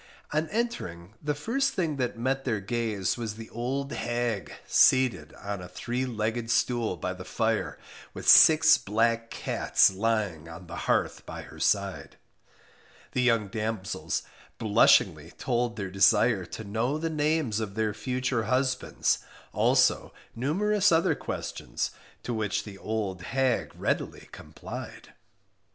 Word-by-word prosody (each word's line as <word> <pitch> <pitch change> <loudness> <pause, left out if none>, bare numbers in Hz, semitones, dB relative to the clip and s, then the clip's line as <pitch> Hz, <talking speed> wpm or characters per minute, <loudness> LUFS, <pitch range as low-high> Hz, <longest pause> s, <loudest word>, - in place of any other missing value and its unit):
On 155 +1 0
entering, 105 - -3
the 150 0 -1
first 270 - 0
thing 160 -6 -1
that 125 -3 -2
met 135 +3 -1
their 115 -5 -1
gaze 110 -1 -1
was 115 -3 -4
the 110 0 -10
old 135 +4 -3
hag, 120 -7 -2
seated 115 - +4
on 100 -2 -5
a 90 - -8
three 125 +6 -3
legged 115 0 -2
stool 120 -6 +1
by 90 +3 -3
the 90 0 -9
fire, 110 +4 -1 0.3
with - - -8
six 160 0 +8
black 115 +2 0
cats - - +2
lying 100 -6 -1
on 85 +3 -10
the 85 0 -8
hearth - - +1
by - - -7
her - - -13
side. - - 0 0.9
The 125 - 0
young 115 -4 +2
damsels 110 -2 -3 0.3
blushingly 95 -7 +3
told 120 -1 -1
their 100 -3 -5
desire 105 +1 +4
to 110 - -8
know 115 +7 -1
the 165 +1 -2
names 150 -7 0
of 105 -3 -4
their 110 -1 0
future 125 +1 -2
husbands, 130 +2 0 0.3
also - - +3 0.2
numerous 200 - +2
other 165 0 +3
questions, - - -4 0.3
to 120 - -3
which 110 -2 -1
the 100 -2 -10
old 105 -4 -3
hag 130 +4 0
readily - - -3
complied. - - -9
115 Hz, 140 wpm, -28 LUFS, 100-130 Hz, 0.9 s, six